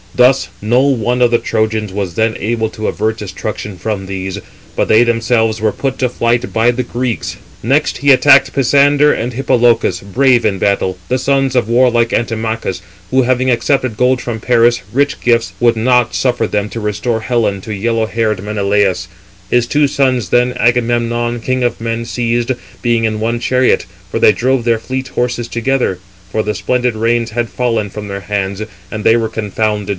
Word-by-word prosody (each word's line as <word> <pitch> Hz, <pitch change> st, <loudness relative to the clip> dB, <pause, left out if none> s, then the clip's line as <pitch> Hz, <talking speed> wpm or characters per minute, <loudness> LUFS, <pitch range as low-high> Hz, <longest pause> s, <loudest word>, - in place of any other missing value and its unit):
Thus 125 Hz, +2 st, +3 dB
no 120 Hz, +5 st, +2 dB
one 125 Hz, -3 st, +1 dB
of 120 Hz, -1 st, +4 dB
the 120 Hz, -, +4 dB
Trojans 110 Hz, -3 st, -1 dB
was 95 Hz, -4 st, -3 dB
then 110 Hz, +1 st, +1 dB
able 110 Hz, 0 st, -1 dB
to 110 Hz, -, -4 dB
avert 110 Hz, +1 st, -1 dB
destruction 105 Hz, 0 st, -6 dB
from 95 Hz, +1 st, -4 dB
these, 95 Hz, 0 st, -4 dB, 0.4 s
but -, -, 0 dB
they 110 Hz, +2 st, +6 dB
themselves 115 Hz, -2 st, +1 dB
were 110 Hz, -1 st, +2 dB
put 135 Hz, +3 st, -3 dB
to 125 Hz, -, +1 dB
flight 120 Hz, 0 st, 0 dB
by 115 Hz, +2 st, +3 dB
the 125 Hz, +1 st, -2 dB
Greeks. 120 Hz, -1 st, -3 dB, 0.3 s
Next 135 Hz, +7 st, +1 dB
[he 140 Hz, 0 st, +4 dB
attacked] 140 Hz, +1 st, +5 dB
Pisander 145 Hz, +2 st, +3 dB
and 120 Hz, +2 st, -3 dB
Hippolochus, 120 Hz, -6 st, +2 dB
brave 125 Hz, +5 st, +2 dB
in 105 Hz, -3 st, +1 dB
battle, 95 Hz, -2 st, 0 dB
the 130 Hz, -, 0 dB
sons 135 Hz, -1 st, +1 dB
of 120 Hz, -3 st, +1 dB
warlike 120 Hz, -1 st, +3 dB
Antimachus, 110 Hz, -5 st, -2 dB, 0.3 s
who 130 Hz, -, +4 dB
having 130 Hz, +1 st, +1 dB
accepted 130 Hz, -1 st, 0 dB
gold 125 Hz, +2 st, +2 dB
from 120 Hz, -2 st, -4 dB
Paris, 120 Hz, 0 st, +3 dB
rich 140 Hz, +4 st, 0 dB
gifts, 115 Hz, -1 st, +1 dB
would 120 Hz, -1 st, +3 dB
not 125 Hz, +1 st, +2 dB
suffer 125 Hz, -2 st, +1 dB
them 105 Hz, 0 st, -1 dB
to 115 Hz, -, -6 dB
restore 110 Hz, +2 st, -2 dB
Helen 110 Hz, -5 st, 0 dB
to 110 Hz, -, -6 dB
yellow 115 Hz, +2 st, 0 dB
haired 110 Hz, -3 st, -1 dB
Menelaus. 100 Hz, -2 st, 0 dB, 0.4 s
His 120 Hz, -1 st, +3 dB
two 145 Hz, +2 st, +2 dB
sons, 130 Hz, -, 0 dB
then, 125 Hz, +3 st, +2 dB
Agamemnon, 120 Hz, 0 st, 0 dB
king 130 Hz, +1 st, -1 dB
of 120 Hz, -, -1 dB
men, 115 Hz, 0 st, -3 dB
seized, 120 Hz, +1 st, -1 dB, 0.3 s
being 120 Hz, -2 st, +1 dB
in 110 Hz, -1 st, -1 dB
one 115 Hz, +1 st, -1 dB
chariot, 125 Hz, +1 st, +1 dB, 0.2 s
for -, -, -2 dB
they -, -, +6 dB
drove 130 Hz, +1 st, 0 dB
their 115 Hz, -2 st, +2 dB
fleet 130 Hz, +2 st, -4 dB
horses 120 Hz, -1 st, -2 dB
together; 120 Hz, -5 st, -1 dB, 0.3 s
for 110 Hz, -, 0 dB
the 105 Hz, 0 st, -2 dB
splendid 125 Hz, -2 st, 0 dB
reins 115 Hz, +1 st, 0 dB
had 120 Hz, 0 st, -2 dB
fallen 115 Hz, -4 st, -1 dB
from 105 Hz, +1 st, -7 dB
their 100 Hz, 0 st, -5 dB
hands, 100 Hz, 0 st, -3 dB, 0.3 s
and 110 Hz, -1 st, -5 dB
they 115 Hz, -, +5 dB
were 115 Hz, -1 st, 0 dB
confounded. 105 Hz, -1 st, -2 dB
115 Hz, 180 wpm, -15 LUFS, 110-125 Hz, 0.4 s, they